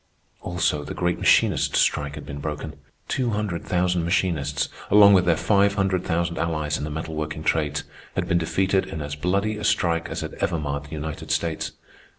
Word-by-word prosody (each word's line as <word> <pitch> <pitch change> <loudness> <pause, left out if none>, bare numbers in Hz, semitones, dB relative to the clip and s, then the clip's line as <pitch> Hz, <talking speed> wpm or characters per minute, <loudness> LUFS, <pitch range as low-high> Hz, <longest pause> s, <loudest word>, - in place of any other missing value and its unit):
Also, 85 -4 0
the 75 - -6
great 90 0 0
machinist - - +3
strike 70 0 +1
had 75 - -8
been 70 0 -7
broken. 75 +1 -5 0.3
Two 130 -3 0
hundred 105 -6 -2
thousand 90 -1 +1
machinists, 80 -6 0 0.2
along 100 0 +8
with 90 -2 +5
their 85 -2 +4
five 100 -1 +3
hundred 95 -2 +1
thousand 85 0 -1
allies 75 -3 -1
in - - -3
the 75 - -3
metalworking 75 0 -4
trades, 75 -2 0 0.3
had - - -1
been 85 - +2
defeated 95 +3 +1
in 80 - -6
as 75 0 -5
bloody 100 +7 0
a 105 - -6
strike 85 -6 +1
as - - -4
had - - -5
ever 85 - 0
marred 70 -1 -3
the - - -14
United 80 0 -6
States. 80 -2 -1
85 Hz, 185 wpm, -24 LUFS, 75-95 Hz, 0.3 s, along